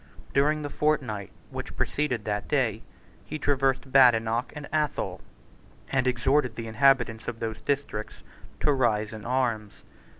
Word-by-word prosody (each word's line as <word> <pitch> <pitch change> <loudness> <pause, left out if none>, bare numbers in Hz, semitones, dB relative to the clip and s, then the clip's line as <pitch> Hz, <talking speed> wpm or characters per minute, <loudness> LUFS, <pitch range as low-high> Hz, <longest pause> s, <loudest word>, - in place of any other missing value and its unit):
During 150 +2 +2
the 145 - -3
fortnight 125 -10 0 0.2
which - - -6
preceded 130 -7 -1
that 105 -1 -2
day, 120 -7 +1 0.4
he 155 - -5
traversed 135 -2 +1
Badenoch 120 -3 +4
and 150 -1 -7
Athol, 150 -1 -1 0.7
and 135 -1 +2
exhorted 125 0 +2
the 115 - -5
inhabitants 115 -1 +2
of 115 -2 -4
those 110 -1 -4
districts 135 -7 -3 0.4
to 150 - +3
rise 110 -5 +1
in 110 -1 -8
arms. 115 -5 -1
125 Hz, 135 wpm, -27 LUFS, 110-140 Hz, 0.7 s, Badenoch